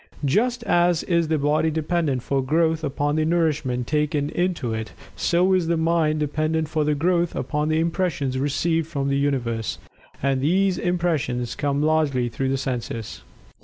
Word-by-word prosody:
Just 235 - +1
as 175 -4 +2
is 170 -2 +1
the 160 0 +1
body 150 +2 +2
dependent 155 -4 -1
for 140 -1 0
growth 160 +3 +1
upon 145 +1 -1
the 155 - +2
nourishment 150 -7 0
taken 150 0 0
into 175 -10 -1
it, 110 0 -5 0.2
so 180 +2 +2
is 180 -3 +2
the 170 0 +1
mind 160 -1 +1
dependent 155 +1 -1
for 150 -1 +1
growth 170 +2 +1
upon 150 0 -1
the 155 - +2
impressions 165 -6 -1
received 160 +3 0
from 140 -4 -2
the 140 - +1
Universe 120 -6 -1 0.4
and 135 -1 0
these 185 +6 +2
impressions 165 -9 -1
come 145 0 -1
largely 150 -6 +1
through 130 +3 -2
the 135 - +1
senses. 120 -4 -4
155 Hz, 160 wpm, -23 LUFS, 140-170 Hz, 0.4 s, as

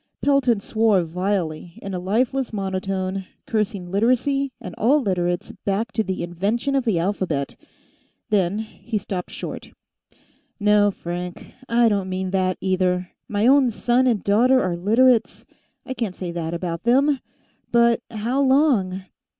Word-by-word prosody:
Pelton 270 -6 +3
swore 215 -2 +2
vilely, 175 -1 -3
in 195 - -6
a 180 - -2
lifeless 240 +8 0
monotone, 190 -1 -3 0.2
cursing 205 -5 -2
Literacy, 255 +6 +1
and 180 - -8
all 270 +8 +4
Literates 175 -7 -1
back 210 +3 -1
to 220 - 0
the 190 -3 -3
invention 205 +10 -1
of 270 -2 +1
the 215 -7 +2
alphabet. 165 -6 -1 0.8
Then 195 -1 +2
he 220 +1 -5
stopped 190 -2 -4
short. - - -7 0.9
"No, 210 0 +4
Frank, 175 -1 -6 0.2
I 235 0 +4
don't 200 -3 0
mean 185 0 -3
that, 185 -1 +1
either. 185 -1 0 0.2
My 205 +1 +1
own 265 0 +5
son 240 +3 +1
and 225 -6 +1
daughter 245 +6 +4
are 180 -7 0
Literates; 225 +6 +2 0.4
I 260 - -4
can't 230 -7 -3
say 180 -2 -5
that 170 -1 -3
about 170 -1 -4
them. 270 +4 +3 0.5
But 235 -1 +4
how 235 +4 -1
long 260 -10 +2
205 Hz, 140 wpm, -22 LUFS, 185-240 Hz, 0.9 s, own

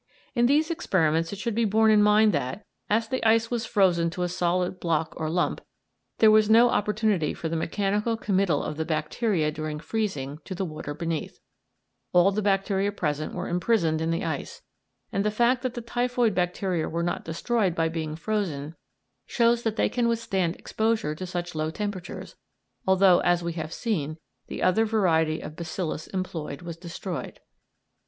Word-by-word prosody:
In 240 -1 +3
these 305 +5 +3
experiments 165 - +1
it 200 - -5
should 230 +2 -2
be 230 +2 +1
borne 220 +1 +4
in 210 -1 +5
mind 210 +1 +5
that, 130 +12 -3 0.2
as 225 +2 +2
the 260 +3 -2
ice 225 +1 +3
was 235 -2 -1
frozen 175 -5 +3
to 180 +2 -3
a - - +1
solid 180 +1 -1
block 160 -2 0
or 155 -1 -3
lump, 175 +2 0 0.6
there 220 -1 +6
was 215 0 +5
no 235 +2 +6
opportunity 210 -5 +1
for 165 - -4
the 165 - -2
mechanical 205 +7 0
committal 195 -8 +1
of 150 - -4
the 160 - 0
bacteria 160 +2 0
during 155 0 -4
freezing 155 -6 -3
to 190 - -6
the 190 - -2
water 155 -3 -6
beneath; 165 -1 -3 0.8
all 180 +2 +5
the 210 +2 -1
bacteria 195 0 +1
present 155 -6 -2
were 180 - -3
imprisoned 175 -3 +1
in 160 - 0
the 165 0 -1
ice, 155 -4 -5 0.5
and 195 - 0
the 210 - +2
fact 240 +4 +2
that 255 -1 -3
the 240 - -4
typhoid 240 -1 0
bacteria 180 -2 -1
were 170 +1 -2
not 175 - -2
destroyed 185 +3 0
by 165 -1 +1
being 160 -2 -3
frozen 165 -6 -2 0.5
shows 235 -1 +2
that 225 -2 -1
they - - +2
can 240 -1 0
withstand 195 -7 0
exposure 220 -8 -1
to 185 +4 -6
such 175 0 -4
low 155 0 -1
temperatures, 190 0 -5 0.5
although, 190 -1 +5
as 175 0 +2
we 170 0 -2
have 160 -1 -5
seen, 160 - -2 0.3
the - - -5
other 185 +5 +4
variety 165 -8 +2
of 155 - -8
bacillus 165 -1 -4
employed 170 -5 -5
was 170 -1 -6
destroyed. 170 +1 -6
185 Hz, 175 wpm, -26 LUFS, 160-215 Hz, 0.8 s, there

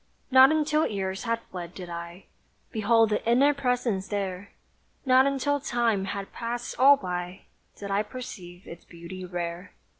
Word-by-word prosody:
Not 260 +2 +8
until 310 0 +2
years 195 0 -4
had 230 0 -1
fled 175 -1 -7
did 180 -2 -8
I 170 +2 -8 0.5
Behold 225 0 +3
the 210 - 0
inner 260 +5 +4
presence 245 -7 -1
there; 200 -1 -4 0.6
Not 260 +1 +5
until 280 +1 0
Time 235 -7 0
had 195 0 -5
passed 240 +1 -5
all 280 +2 +7
by, 180 -2 -5 0.4
Did 200 -1 -6
I 200 +1 +2
perceive 190 -7 -9
its 170 - -10
beauty 170 +2 -10
rare. 175 0 -5
205 Hz, 150 wpm, -27 LUFS, 180-250 Hz, 0.6 s, Not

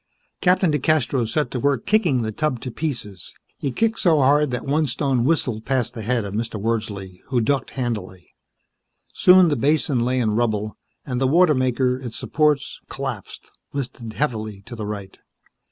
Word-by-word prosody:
Captain 180 -2 +3
DeCastros 140 -4 +1
set 150 +2 0
to 125 - -2
work 140 -2 0
kicking 175 - +2
the 110 - -2
tub 130 +2 -1
to 125 - -6
pieces. 115 - -5 0.2
He 140 - -2
kicked 225 - 0
so 165 -4 +4
hard 145 +2 +4
that 125 -1 -4
one 150 +2 +1
stone 130 -1 0
whistled 130 -8 0
past 125 -2 -1
the 115 - -6
head 115 0 0
of 100 - -6
Mr. 110 0 -3
Wordsley, 100 -4 -3
who 130 -3 +1
ducked 130 +3 0
handily. 105 -8 -4 0.8
Soon 180 -1 +6
the 145 - +1
basin 145 0 +2
lay 125 +2 +1
in 115 -4 +1
rubble, 110 -2 -1 0.3
and 125 -2 -3
the 135 - +3
water 170 +3 +5
maker, 130 -1 +1
its 120 -3 -7
supports 150 -2 0
collapsed, 135 -7 -6 0.2
listed 120 -5 -5
heavily 110 -8 -3
to 120 -1 -9
the 110 -2 -5
right. 100 -2 -7
125 Hz, 170 wpm, -22 LUFS, 110-145 Hz, 0.8 s, Soon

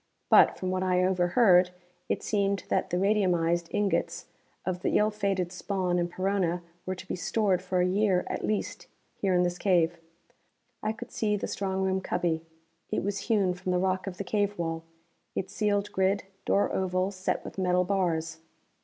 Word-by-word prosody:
But, - - +7
from 185 0 -2
what 185 0 -1
I 185 -1 +2
overheard, 180 0 +4 0.4
it - - -1
seemed 200 -3 0
that - - +1
the 175 - 0
radiumized 175 -4 +2
ingots 205 -1 0 0.4
of 180 -1 -2
the - - +2
ill 210 +1 +3
fated 195 -4 -1
Spawn 185 -1 -1
and 175 0 0
Perona 185 -2 0 0.2
were 185 - -1
to 185 - -11
be - - -2
stored 190 0 +1
for 185 -1 0
a - - +3
year 190 -1 +2
at - - -4
least, 215 -1 -2 0.3
here 190 -2 0
in 180 - +4
this 175 0 -1
cave. 175 -3 +2 0.8
I 215 - 0
could 240 +2 -9
see 210 -2 0
the - - -3
strong 190 -1 -2
room 190 0 +1
cubby. 175 -3 -1 0.5
It - - -1
was 200 0 -3
hewn 200 -5 +3
from 180 +1 -4
the 180 - +2
rock 185 +1 0
of 180 -2 -5
the - - -3
cave 205 +1 0
wall, 165 -1 -3 0.5
its 190 - -3
sealed 205 -1 0
grid 190 +1 +1 0.2
door 200 - +2
oval 185 0 0
set 185 -1 -2
with - - -7
metal 180 -1 +2
bars. 165 -4 -1
185 Hz, 180 wpm, -28 LUFS, 180-200 Hz, 0.8 s, But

